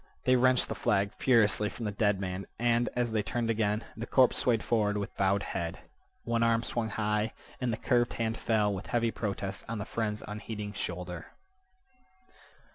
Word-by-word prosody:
They 130 - +4
wrenched 130 0 +4
the - - -3
flag 100 -4 +1
furiously 105 -4 +3
from 115 - -6
the 105 - -1
dead 105 -1 +1
man, 95 0 -4
and, 120 0 +2
as 120 -1 0
they 110 -1 +1
turned 115 +2 -1
again, 105 -1 0
the 115 +2 -5
corpse 130 -2 +4
swayed 115 -3 +2
forward 105 -3 +1
with 100 - -4
bowed 100 +1 +2
head. 85 -2 -3 0.5
One 115 0 0
arm 115 0 +3
swung 115 -2 -2
high, 105 +1 0 0.3
and 125 -2 +1
the 110 - -2
curved 120 0 +2
hand 115 -1 -1
fell 105 -3 +1
with 95 - -6
heavy 115 -1 +1
protest 100 -3 -4
on 115 - -2
the 105 - -4
friend's 105 -2 -2
unheeding 105 -1 -5
shoulder. 90 -3 -5
110 Hz, 180 wpm, -30 LUFS, 105-115 Hz, 0.5 s, They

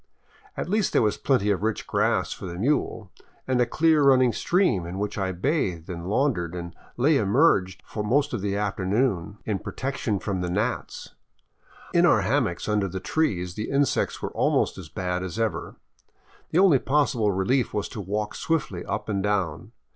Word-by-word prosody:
At - - -3
least 210 +2 +1
there - - +4
was 105 -2 +2
plenty 105 -7 +2
of 95 - -1
rich 110 0 -1
grass - - +1
for 95 - -8
the 85 - -6
mule, 130 +10 -1 0.4
and 130 -1 +2
a 120 - +2
clear 155 +3 +3
running 130 -3 +5
stream 175 - +1
in 90 +2 -6
which 105 +1 -3
I 95 -2 -1
bathed 90 - -1
and 85 0 -6
laundered 105 - 0
and 85 -1 -6 0.2
lay 140 +5 +4
emerged 100 - +2
most 125 +8 +1
of 115 - -2
the 100 0 -1
afternoon 100 -1 -1
in 105 -3 -1
protection 130 -6 -3
from 95 0 -3
the 90 - -2
gnats. 105 +7 -3 0.8
In - - +5
our - - +4
hammocks 85 0 0
under 105 -2 +1
the 95 +1 -5
trees 90 - -1
the 105 +3 -4
insects 140 0 0
were - - -3
almost - - +1
as - - -9
bad 90 -1 -2
as 90 0 -5
ever. 115 -2 -2 0.7
The - - 0
only 180 -8 +6
possible 130 -7 +1
relief 110 +7 +1
was 105 - -2
to 105 - -6
walk 105 +2 -3
swiftly 140 - -2
up - - -4
and 100 -2 -1
down. 95 -6 -1
105 Hz, 175 wpm, -25 LUFS, 95-135 Hz, 0.8 s, only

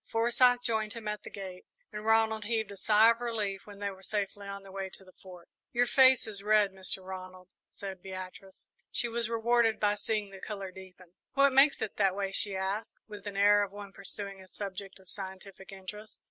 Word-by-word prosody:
Forsyth 245 +2 +4
joined 220 -3 0
him 230 -2 -7
at 210 0 -2
the - - -9
gate, 190 -2 -8 0.3
and 210 0 -5
Ronald 220 -1 +3
heaved 220 -2 -1
a - - -7
sigh 215 +3 +6
of 230 +1 -3
relief 210 -5 -2
when 205 -1 -10
they 200 0 -2
were 190 0 -13
safely 200 0 -3
on 200 0 -6
their 195 - -12
way 195 0 -4
to 190 - -10
the 185 - -16
Fort. 180 -2 -13 0.3
"Your 245 0 +4
face 260 +1 +6
is 210 -3 -5
red, 210 -1 +4
Mr. 190 0 -3
Ronald," 185 -1 -8 0.2
said 190 -2 -7
Beatrice. 185 0 -9 0.2
She 240 - -1
was 230 -1 -2
rewarded 230 0 +3
by 205 -1 +3
seeing 210 -1 -2
the 195 - -10
colour 195 -2 -5
deepen. 185 -1 -13 0.2
"What 275 -1 +5
makes 275 +2 +5
it 215 - -5
that 195 -2 +3
way?" 195 -1 -1
she 195 0 -1
asked, 190 +3 -2
with 210 -2 -10
the 205 -1 -5
air 205 +1 +6
of 200 -2 -1
one 205 -1 -9
pursuing 200 0 -6
a 190 - -14
subject 195 0 -6
of 190 - -20
scientific 190 0 -7
interest. 210 +3 -9
205 Hz, 210 wpm, -31 LUFS, 190-220 Hz, 0.3 s, sigh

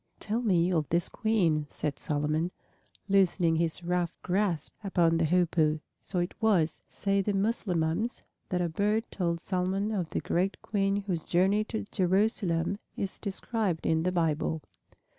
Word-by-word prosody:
"Tell 220 +3 -1
me 180 -6 +3
of 155 -4 0
this 170 0 +2
Queen," 175 -10 +1
said 145 -3 -3
Solomon, 150 +3 0 0.6
loosening 185 -4 +3
his 165 +1 0
rough 175 -1 0
grasp 180 -4 0
upon 170 -4 +3
the 165 - +2
Hoopoe. 160 -2 +2 0.2
So 190 - -2
it 175 0 0
was, 180 -8 +2
say 200 0 0
the 205 +1 -1
Mussulmans, 195 -1 0 0.3
that 180 -1 0
a - - +1
bird 210 +6 +1
told 170 -3 -1
Solomon 190 +3 -1
of 185 -6 -2
the - - -1
great 185 +3 0
Queen 200 -1 0
whose 175 -5 -2
journey 195 +4 +2
to 220 -1 -4
Jerusalem 190 -1 +1 0.2
is 195 -1 -3
described 200 -3 -2
in 160 0 +2
the 180 +2 +1
Bible. 160 -2 0
180 Hz, 150 wpm, -29 LUFS, 165-200 Hz, 0.6 s, me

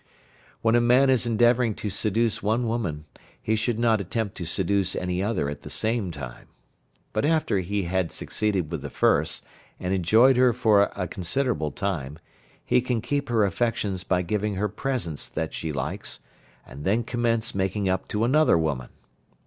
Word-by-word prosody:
When 115 0 +3
a 120 - +5
man 125 +3 +5
is 125 -2 +2
endeavouring 120 0 +3
to 105 - -4
seduce 110 +3 0
one 110 +4 +1
woman, 100 -10 -2 0.3
he 110 - 0
should 110 +1 -1
not 115 -3 +2
attempt 100 +2 -3
to 85 - -4
seduce 95 +2 0
any 90 0 -2
other 100 -7 0
at 70 0 -5
the - - -9
same 110 -3 0
time. 70 -7 -8 0.7
But 110 - 0
after 155 -9 +2
he 100 +2 -2
had 90 0 -1
succeeded 95 -7 -1
with 80 -4 -3
the - - -6
first, - - +1 0.3
and 90 +1 -2
enjoyed 110 +8 +5
her 125 -1 +5
for 110 -4 +4
a 90 -2 -2
considerable 95 - -1
time, 75 -7 -3 0.5
he 125 - +3
can 125 -1 -1
keep 140 +4 -2
her 110 -3 +3
affections 100 -2 -1
by 90 +1 +1
giving 105 +3 -1
her 105 +3 0
presents 100 - -3
that 80 -1 -4
she 80 - -3
likes, 70 - -4 0.5
and 70 - -10
then 110 +7 +1
commence 120 -1 0
making 95 +1 -1
up 95 0 -1
to 105 +1 -1
another 140 - +4
woman. 75 -7 -2
105 Hz, 175 wpm, -25 LUFS, 90-120 Hz, 0.7 s, a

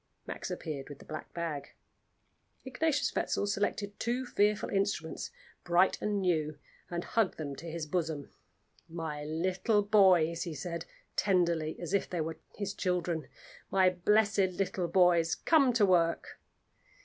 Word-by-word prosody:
Max - - -5
appeared 145 -3 -5
with 145 - -8
the - - -15
black 155 - -7
bag. 165 -4 -4 0.9
Ignatius 290 +2 0
Wetzel - - 0
selected 205 0 -2
two 245 +3 -1
fearful 210 -3 +1
instruments, 195 -5 -1 0.3
bright 175 +2 +3
and 210 -1 0
new, 155 -5 0 0.3
and 175 0 -3
hugged 225 -5 0
them 145 -3 -4
to 165 - -7
his 165 -1 -4
bosom. 155 -3 -2 0.6
"My 160 -3 -4
little 185 +7 +1
boys," 185 -6 +4
he 170 -3 -4
said, 170 0 -4 0.3
tenderly, 170 -5 +1
as 175 +1 -5
if 200 - +1
they 175 - -3
were 160 0 -3 0.2
his 200 -1 -3
children; 175 -4 -1 0.4
"my 190 -1 +4
blessed 210 +4 +2 0.2
little 185 -2 -1
boys, 170 -2 +4
come 285 -6 +4
to 225 -3 +4
work!" 170 -3 +1
180 Hz, 140 wpm, -31 LUFS, 160-200 Hz, 0.9 s, boys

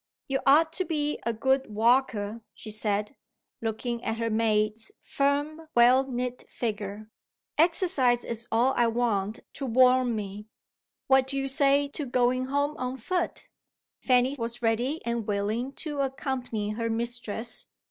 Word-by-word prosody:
"You 270 -2 0
ought 315 +4 +5
to 370 - -1
be 300 -4 -1
a - - +2
good 265 +2 0
walker," 230 -2 +2
she 215 - -9
said, 210 +2 -1 0.5
looking 230 +1 -3
at 225 0 -2
her 230 0 -1
maid's 215 0 0
firm 290 +3 -1
well 250 +3 +5
knit 250 0 -3
figure. 215 -1 -4 0.5
"Exercise 320 -8 +3
is 230 0 -5
all 240 +4 +3
I 240 - +3
want 225 -3 -1
to 275 - -4
warm 255 0 +4
me. 205 0 -6 0.6
What 265 -1 +4
do 275 +1 -3
you 270 0 -1
say 280 +1 +3
to 285 0 -4
going 250 +1 +1
home 285 +3 0
on 255 +1 -3
foot?" 355 +8 -3 0.5
Fanny 255 +1 +3
was 235 +1 -4
ready 240 +7 0
and 235 -2 -2
willing 215 +5 -1
to 295 -2 -5
accompany 260 -6 -2
her 230 +1 -2
mistress. 235 -1 -1
245 Hz, 145 wpm, -27 LUFS, 225-270 Hz, 0.6 s, ought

